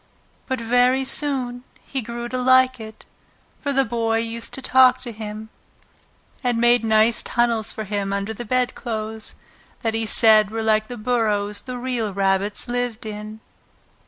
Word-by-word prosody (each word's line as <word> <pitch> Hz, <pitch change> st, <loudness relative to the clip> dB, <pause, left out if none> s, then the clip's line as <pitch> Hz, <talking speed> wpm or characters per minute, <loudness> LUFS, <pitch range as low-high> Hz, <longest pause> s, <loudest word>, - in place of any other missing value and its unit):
But 260 Hz, -2 st, -2 dB
very 245 Hz, +3 st, +2 dB
soon 260 Hz, -3 st, -1 dB, 0.2 s
he 270 Hz, -, -4 dB
grew 235 Hz, +1 st, -6 dB
to 255 Hz, -, -2 dB
like 255 Hz, 0 st, +4 dB
it, 220 Hz, -1 st, -11 dB, 0.5 s
for 285 Hz, -, -2 dB
the 270 Hz, -1 st, +2 dB
Boy 225 Hz, -1 st, 0 dB
used 230 Hz, 0 st, -3 dB
to 265 Hz, -, -7 dB
talk 255 Hz, 0 st, +5 dB
to 240 Hz, -, -6 dB
him, 215 Hz, 0 st, -7 dB, 0.9 s
and 245 Hz, -2 st, +1 dB
made 240 Hz, 0 st, +4 dB
nice 220 Hz, +1 st, +3 dB
tunnels 230 Hz, -2 st, 0 dB
for 220 Hz, -, -5 dB
him 200 Hz, -1 st, -3 dB
under 200 Hz, +2 st, -2 dB
the 240 Hz, -, -7 dB
bedclothes 225 Hz, -3 st, -3 dB, 0.5 s
that 225 Hz, -1 st, 0 dB
he 225 Hz, 0 st, -1 dB
said 215 Hz, -1 st, +5 dB
were 225 Hz, +1 st, -3 dB
like 215 Hz, 0 st, +2 dB
the 245 Hz, -, -7 dB
burrows 210 Hz, -3 st, 0 dB
the 255 Hz, -1 st, -6 dB
real 240 Hz, -5 st, -3 dB
rabbits 195 Hz, +3 st, +1 dB
lived 245 Hz, -2 st, -3 dB
in. 215 Hz, +1 st, -7 dB
230 Hz, 160 wpm, -22 LUFS, 215-245 Hz, 0.9 s, talk